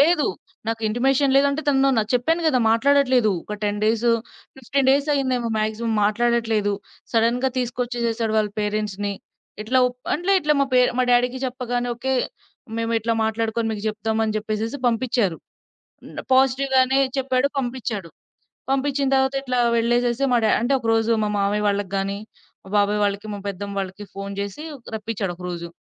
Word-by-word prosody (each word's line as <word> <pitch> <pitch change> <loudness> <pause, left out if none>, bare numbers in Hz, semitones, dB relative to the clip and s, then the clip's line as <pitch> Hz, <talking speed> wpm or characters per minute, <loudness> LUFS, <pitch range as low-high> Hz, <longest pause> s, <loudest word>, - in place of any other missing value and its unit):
లేదు. 305 0 +4 0.4
నాకు 225 0 -2
ఇంటిమేషన్ 265 +4 +2
లేదు. 275 - +5
అంటే 300 +3 -2
తను 275 -1 +4
నా - - +4
చెప్పాను 325 +8 +1
గదా! 280 -5 +3
మాట్లాడట్లేదు. 255 -1 +3
ఒక 210 - -5
10 205 0 -1
డేసు, 225 +2 +2 0.5
15 265 +1 0
డేస్ 280 +2 +2
అయిందేమో 255 -4 0
మాక్సిమం 220 +2 -1
మాట్లాడట్లేదు. 225 -1 +1 0.4
సడెన్‌గా 235 +3 +2
తీసుకొచ్చేసేసాడు, 240 -2 -1
వాళ్ళ 210 -1 0
పేరెంట్స్‌ని. 205 -1 -2 0.5
ఇట్లా 255 +4 +1
ఒ - - +2 0.3
అంటే 355 +6 0
ఇట్లా 300 -2 +2
మా - - +4
పే 255 - +6 0.2
మా - - +4
డ్యాడీకి 245 +1 +2
చెప్పగానే 245 -1 -2
ఓకే. 265 +3 -2 0.7
"మేమిట్లా 230 0 0
మాట్లాడుకొని 225 +1 -1
మీకు 210 -2 -4
చెప్దాం" 220 +1 -2
అని 215 - -2
జెప్పేసేసి 215 +4 -3
పంపిచ్చారు. 230 -6 +1 0.7
మ్ - - -13 0.2
పాజిటివ్‌గానే 265 0 +3 0.2
చెప్పాడు, 260 0 +1
పంపిచ్చాడు. 240 -8 -4 0.6
పంపిచ్చిన 275 +1 +1
తరువాత 265 0 +2
ఇట్లా 250 -2 -1 0.2
వెళ్ళేసేసి 240 +2 +1
మా 245 - +5
డ్యా 215 - +3
అంటే 240 +4 0
ఒకరోజు 225 -1 +2
మా 210 - 0
మావయ్య 205 +1 +1
వాళ్ళకి 200 -1 -1
గాని, 195 +1 -2 0.5
మా - - -13
బాబాయ్ 205 +1 +2
వాళ్ళకి, 200 +1 -2
మా - - -5
పెద్దమ్మ 200 +1 -5
వాళ్ళకి 190 +2 -6
ఫోన్ 195 0 -5
జేసి 200 +9 -4 0.3
రప్పిచ్చాడు 215 -3 -3
ఒకరోజు. 175 -1 -6
235 Hz, 150 wpm, -22 LUFS, 210-260 Hz, 0.7 s, పే